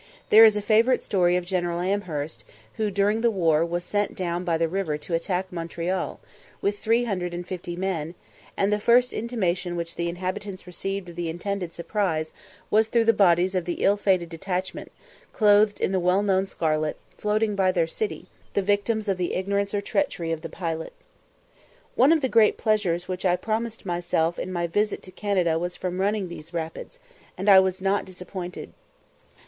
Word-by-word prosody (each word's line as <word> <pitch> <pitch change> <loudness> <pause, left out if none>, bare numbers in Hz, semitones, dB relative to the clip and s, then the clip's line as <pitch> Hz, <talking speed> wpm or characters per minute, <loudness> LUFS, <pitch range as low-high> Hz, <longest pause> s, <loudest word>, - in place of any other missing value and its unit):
There 220 +1 +10
is 215 -1 +5
a 205 - -3
favourite 230 +4 +3
story 180 -3 +2
of 180 -1 -1
General 175 -2 -1
Amherst, 160 - -3 0.3
who 215 -1 0
during 205 +3 +1
the 235 - +4
war 165 -7 +2
was 175 +1 -2
sent 205 +1 -1
down 175 -1 -2
by 170 -2 +1
the 165 0 +1
river 170 -3 -2
to 150 +3 -8
attack 180 +2 -1
Montreal, 170 +2 -3 0.4
with 205 0 -1
three 230 +2 +2
hundred 180 -6 -2
and 175 0 -5
fifty 175 -1 -5
men, 175 -3 -3 0.4
and 200 +1 +2
the 210 - +1
first 245 +3 +4
intimation 185 -6 -1
which 170 -1 -4
the 170 0 -1
inhabitants 185 +2 -5
received 195 +2 -4
of 170 - -11
the 170 -1 -3
intended 180 +1 -4
surprise 170 -4 -1 0.4
was 220 +1 +4
through 230 0 +2
the 230 - +5
bodies 185 -2 +4
of 180 -2 -1
the 175 - -2
ill 200 - +5
fated 185 -4 +1
detachment, 180 +3 -4 0.4
clothed 210 -1 +4
in - - 0
the 190 - +1
well 180 +3 +2
known 195 -1 +2
scarlet, 155 -4 -1 0.2
floating 210 0 0
by 190 -2 +3
their 175 -3 +1
city, 415 - -4 0.3
the 200 - +2
victims 205 +2 0
of 195 -2 +1
the 180 -1 -2
ignorance 200 +1 -1
or 205 - -1
treachery 195 - -1
of 160 -1 -2
the 165 - -6
pilot. 165 -2 -4 1.0
One 290 - +5
of 325 -2 +4
the 265 - +1
great 225 -4 +4
pleasures 200 -6 0
which 185 -1 -4
I 180 -2 +3
promised 220 +3 -3
myself 175 -2 0
in 185 - -4
my 175 -1 -1
visit 205 +5 -1
to 185 - -10
Canada 180 -5 0
was 175 +1 -3
from 180 0 -3
running 200 -1 0
these 170 0 -10
rapids, 165 - -5 0.4
and 195 - -4
I 195 -2 +9
was 190 0 0
not 195 +1 +2
disappointed. 180 -1 -7
185 Hz, 185 wpm, -25 LUFS, 175-205 Hz, 1.0 s, There